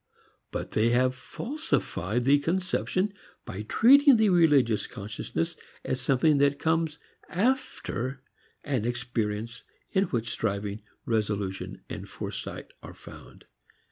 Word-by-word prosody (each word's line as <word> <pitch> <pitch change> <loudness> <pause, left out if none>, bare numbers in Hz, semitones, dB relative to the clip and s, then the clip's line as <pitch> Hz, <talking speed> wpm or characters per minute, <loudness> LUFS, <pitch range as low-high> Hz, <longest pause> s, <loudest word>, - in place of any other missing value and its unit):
But - - -5
they 110 +2 +3
have 125 +2 +3
falsified 130 - -2
the 140 +2 +5
conception 185 +4 0 0.3
by 95 - -5
treating 265 - +6
the 220 -1 +4
religious 145 - +4
consciousness 100 -7 -4 0.3
as 130 - -1
something 140 +4 +3
that 140 0 +3
comes 160 0 0 0.3
after 170 - -1 0.4
an 135 -6 -1
experience 115 -1 -2 0.3
in 195 0 +3
which 115 - -2
striving, 100 -1 -2 0.2
resolution 105 -4 -2
and - - -7
foresight - - -6
are - - -10
found. - - -13
130 Hz, 110 wpm, -28 LUFS, 110-170 Hz, 0.4 s, treating